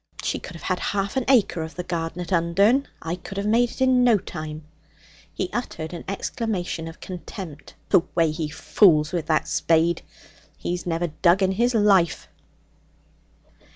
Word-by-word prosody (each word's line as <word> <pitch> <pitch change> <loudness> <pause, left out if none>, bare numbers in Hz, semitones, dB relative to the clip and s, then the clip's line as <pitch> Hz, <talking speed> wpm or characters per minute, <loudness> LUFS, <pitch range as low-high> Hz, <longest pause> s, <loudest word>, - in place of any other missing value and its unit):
'She - - -1
could 185 - -10
have 165 - -11
had 185 - -1
half 200 +2 -2
an 265 - +1
acre 235 -10 +3
of 160 0 -6
the 180 - -4
garden 170 -1 -3
at 175 - -10
Undern; 200 +11 +3 0.2
I 165 +2 -2
could 195 +2 -9
have 200 - -2
it - - +1
made 235 +3 +2
in 260 -1 +4
no 240 -3 +5
time.' 155 -4 -7 0.7
He - - -3
uttered 170 -9 -4
an 170 - -7
exclamation 195 -4 -3
of 165 - -10
contempt. 180 -3 -8
'The - - +6
way 165 -2 +3
he 155 0 -3
fools 155 -1 +3
with 170 -4 -2
that 155 -1 +1
spade! 165 +1 +2 0.6
He's 180 0 -4
never 170 0 0 0.2
dug 185 +2 +5
in 190 - +3
his 235 +5 +1
life.' 195 -6 +3
180 Hz, 170 wpm, -24 LUFS, 165-205 Hz, 0.7 s, The